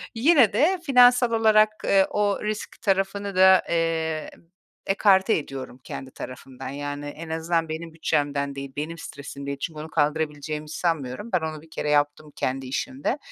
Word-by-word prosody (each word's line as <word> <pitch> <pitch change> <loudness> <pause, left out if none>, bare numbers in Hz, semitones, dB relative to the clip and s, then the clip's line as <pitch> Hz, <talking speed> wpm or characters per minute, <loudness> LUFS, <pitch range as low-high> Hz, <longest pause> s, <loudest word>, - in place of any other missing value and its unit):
yine 255 - +5
de 345 - +3
finansal 245 -3 +6
olarak, 215 -1 +5 0.2
eee, 195 -1 +4
o 205 -1 0
risk 215 0 -4
tarafını 195 0 0
da, 190 0 +6
eee, 160 -2 -1 0.6
ekarte 195 +1 +4
ediyorum 135 -4 -7
kendi 135 0 -7
tarafımdan. 130 +1 -8
Yani, 145 +1 -5
en 155 +3 -8
azından 165 0 -1
benim 160 +1 -6
bütçemden 145 -3 -1
değil, 140 0 -6
benim 155 +3 -4
stresim 140 -2 -8
değil. 140 0 -4
Çünkü 160 -3 -4
onu 155 +1 -7
kaldırabileceğimi 150 0 -1
sanmıyorum. 155 - -2
Ben 180 - +4
onu 155 -1 -4
bir 160 - -18
kere 150 - -3
yaptım 145 +1 +1
kendi 130 +1 -2
işimde. 265 - -2
160 Hz, 155 wpm, -25 LUFS, 145-200 Hz, 0.6 s, finansal